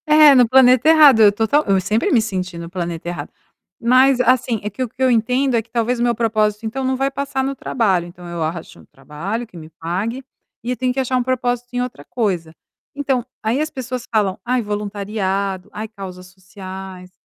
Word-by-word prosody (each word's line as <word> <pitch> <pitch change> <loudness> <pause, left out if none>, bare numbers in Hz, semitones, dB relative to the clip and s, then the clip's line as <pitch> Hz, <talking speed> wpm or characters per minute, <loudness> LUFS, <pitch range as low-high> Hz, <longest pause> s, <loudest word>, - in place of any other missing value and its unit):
É, 305 -1 +7
no 250 -3 +5
planeta 255 +3 +5
errado, 300 -8 +7
eu 210 -1 +7
total 225 +8 +1
eu 195 -1 +3
sempre 210 +5 0
me 235 - +4
senti 185 -5 -4
no 170 0 -7
planeta 175 -2 -5
errado. 160 -4 -5 0.5
Mas 255 +2 +4
assim, 250 -2 +2
é 210 - -2
que 210 +6 -8
eu 255 - -1
que 255 - -13
eu 260 - +4
entendo 250 +3 +1
é 230 - +2
que 230 - -23
talvez 235 +1 0
meu 240 0 +1
propósito 215 -1 0
então 260 +5 -3
não 260 0 0
vai 270 +1 -1
passar 275 -1 -2
no 275 +1 -2
trabalho. 195 -10 0
Então 175 0 -12
eu 170 -1 -5
acho 160 - -5
um 80 - -17
trabalho 160 - -6
que 185 - -14
me 155 -1 -10
pague 185 - -4 0.4
e 245 - -3
eu 250 - -2
tenho 255 -1 0
que 270 - -3
achar 260 -1 0
um 250 - +1
propósito 245 -1 -1
em 245 - -1
outra 245 - -6
coisa. 185 -9 -2 0.4
Então, 270 -4 -1 0.2
aí 230 +6 0
as 310 - -1
pessoas 255 -3 -6
falam: 200 -3 +1
"Ai, 250 0 +1
voluntariado, 200 -2 -3
ai 215 +1 -6
causas 185 -4 -10
sociais, 185 0 -10
225 Hz, 210 wpm, -19 LUFS, 190-255 Hz, 0.5 s, É